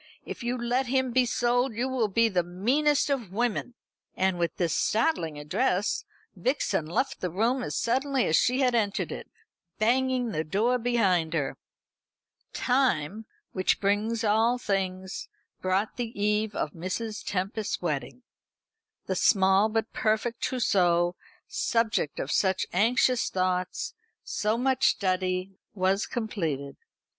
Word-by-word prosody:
If - - -7
you 240 +1 -1
let 245 +2 0
him 260 0 +1
be 250 0 +3
sold, 245 0 +1
you 245 +3 0
will 255 -4 0
be 230 +3 +3
the 185 -5 +1
meanest 265 - +1
of 240 -9 -2
women." 240 +3 -1 0.4
And 190 -2 +1
with 170 -1 -1
this 170 -3 0
startling 210 - +1
address 180 +7 0 0.3
Vixen 205 - 0
left 220 - -1
the 180 - -1
room 230 +9 +1
as - - -4
suddenly 265 +2 +1
as 160 - +2
she 255 +3 +3
had 250 -2 +3
entered 215 -3 0
it, - - -7 0.5
banging 250 +1 +1
the 155 -5 -1
door 220 +10 +1
behind 190 -9 +1
her. 145 -4 -1 1.0
Time, 220 - 0 0.2
which 185 -1 +1
brings 210 +3 0
all 225 +3 +3
things, 190 -4 -3 0.3
brought 190 +3 0
the 235 -3 -4
eve 210 +1 +1
of 150 - -2
Mrs. 185 +6 -4
Tempest's 200 +3 -2
wedding. 170 - -3 0.8
The - - -1
small 195 0 +4
but 225 0 -2
perfect 220 +2 0
trousseau, 175 -8 +2 0.3
subject 225 -10 0
of 135 - -3
such 190 -1 +2
anxious 235 +5 +3
thoughts, 185 -1 -1 0.3
so 215 +2 -1
much 260 +1 +2
study, 185 -1 0 0.2
was 190 +1 +1
completed. 160 - -3
215 Hz, 135 wpm, -27 LUFS, 185-245 Hz, 1.0 s, small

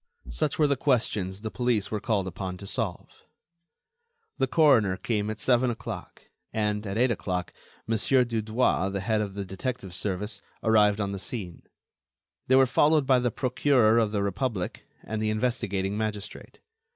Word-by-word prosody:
Such 155 -3 -1
were 155 - +4
the 140 -1 +2
questions 105 -8 0
the 110 0 -4
police 120 -5 0
were 105 - -1
called 100 -3 0
upon 95 0 -5
to 100 - -10
solve. 100 -4 -4 1.2
The 135 - +2
coroner 125 - +4
came 105 -1 -1
at 110 0 -5
seven 125 +2 +3
o'clock; 115 -2 -7 0.3
and, 105 -1 -1
at 100 +2 -3
eight 125 +1 +3
o'clock, 90 -5 -3 0.3
Mon. 110 -1 0
Dudouis, 115 -5 +1
the 100 - -2
head 110 +1 +1
of 100 -2 -4
the 100 -1 -4
detective 95 0 -5
service, 100 +2 -3 0.2
arrived 105 -2 +4
on 100 -1 -1
the 100 - -4
scene. 95 -5 -6 0.9
They 130 - +5
were 135 0 +7
followed 150 +3 +3
by 130 -1 +4
the 125 0 +1
Procureur 125 -2 +3
of 110 -2 +1
the 100 -2 0
Republic 100 -1 -3 0.2
and 110 0 -4
the 110 - +1
investigating 105 -4 -1
magistrate. 105 -2 -5
110 Hz, 165 wpm, -27 LUFS, 100-125 Hz, 1.2 s, were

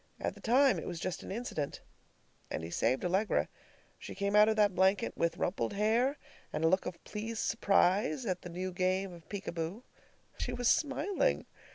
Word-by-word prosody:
At - - -2
the - - -15
time, 260 +3 +4
it - - -7
was 175 -2 -4
just 185 +1 -3
an - - -8
incident. 195 -10 -3 0.7
And 80 - -4
he 80 - -6
saved 130 - +1
Allegra. 190 +4 +1 0.5
She - - -8
came 200 0 0
out 210 +1 +7
of 220 - +2
that 205 -2 +3
blanket 190 +1 +2
with 170 0 0
rumpled 185 - -1
hair 230 +7 +2 0.3
and 155 - -2
a - - +5
look 185 +3 +2
of 180 - -7
pleased 220 +1 -4
surprise 205 +4 +2
at 185 -4 -2
the 180 - -8
new 185 +2 -4
game 185 +1 0
of 170 -2 -14
peek 200 -2 -5
a - - -3
boo. 170 +7 -4 0.6
She - - -2
was 245 -1 0
smiling! 320 +6 +1
195 Hz, 195 wpm, -32 LUFS, 180-225 Hz, 0.7 s, out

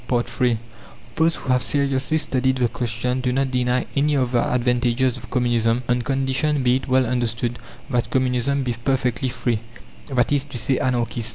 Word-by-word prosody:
III 120 0 +1 0.6
Those 165 +1 +2
who - - -8
have 125 0 +3
seriously 140 +2 +1
studied 130 -3 0
the 125 -2 +2
question 125 +2 -2
do 125 -1 0
not 135 +1 0
deny 125 0 +1
any 145 +1 +2
of 130 -3 +1
the 120 -2 +1
advantages 125 0 +1
of 120 -2 -10
Communism, 120 -1 +1
on 125 0 +1
condition, 135 +3 0
be 125 0 +4
it 135 - -7
well 130 0 +3
understood, 120 -1 -1 0.3
that 120 -2 0
Communism 130 +1 +1
be 125 -2 -1
perfectly 125 +1 -1
free, 120 -2 -1 0.5
that 125 -3 +1
is 145 -2 +2
to 140 -3 -6
say, 130 +3 0
Anarchist. 120 -2 -1
125 Hz, 175 wpm, -22 LUFS, 120-135 Hz, 0.6 s, be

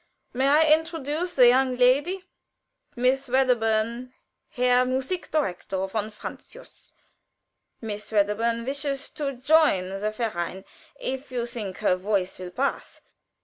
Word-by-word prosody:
"May 260 +2 +1
I 300 +3 +5
introduce 320 +1 -2
the 250 -2 +7
young 255 0 +2
lady? 285 +10 +3 0.7
Miss 260 +2 +1
Wedderburn, 240 -1 +1 0.4
Herr 250 0 +3
Musik 265 +8 -2
Direktor 190 - -1
von 215 +2 -3
Francius. 220 - -11 0.9
Miss 210 -2 -6
Wedderburn 225 +3 +1
wishes 280 0 -3
to 280 -2 -3
join 260 - +3
the 195 +2 -2
verein, 195 -4 -4 0.3
if 265 +1 -4
you 240 -2 -2
think 215 -6 -6
her 180 - +2
voice 190 -1 -2
will 180 -1 -6
pass. 265 +10 -3
250 Hz, 120 wpm, -25 LUFS, 215-275 Hz, 0.9 s, the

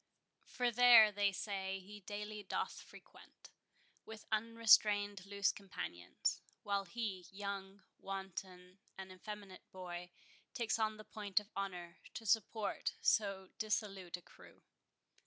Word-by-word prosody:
For 245 -1 0
there, 235 -2 +9
they 205 0 +2
say, 195 0 -3
he 205 +2 -11
daily 210 +1 -5
doth 195 - -3
frequent - - -16 0.5
With 220 0 -10
unrestrained 210 -3 +4
loose 200 -1 +2
companions; 90 - -3 0.2
While 200 -1 0
he, 195 -2 -4
young, 195 0 -5 0.2
wanton, 190 -1 -6 0.2
and 190 -1 -7
effeminate 195 0 -9
boy, 180 -1 -6 0.5
Takes 230 -2 0
on 215 -1 +1
the 215 - -9
point 210 -2 0
of 210 0 -14
honour, 180 -3 -4 0.2
to 225 - -6
support 220 0 +1
So 195 -3 +2
dissolute 195 -4 -1
a 180 - -17
crew. - - -17
200 Hz, 120 wpm, -37 LUFS, 190-215 Hz, 0.5 s, there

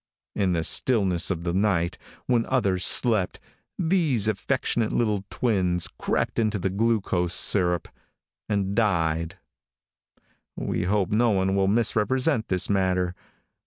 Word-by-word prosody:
In 95 -3 0
the 80 -1 -1
stillness 95 -6 +1
of 85 -3 -3
the 85 -1 -2
night, 90 -3 0 0.3
when 120 -2 +1
others 100 -8 0
slept, 110 -5 +2 0.4
these 160 - +1
affectionate 115 +1 -1
little 105 -4 0
twins 90 -8 0
crept - - -1
into 110 -2 0
the 95 0 -2
glucose 95 -5 0
syrup 90 -3 +2 0.6
and 100 -2 -1
died. 85 -6 0 1.2
We - - -3
hope 100 -1 0
no 115 +3 +3
one 95 -2 +1
will 95 -1 +2
misrepresent 115 +4 +1
this 95 0 0
matter. 90 -2 0
100 Hz, 125 wpm, -25 LUFS, 90-115 Hz, 1.2 s, no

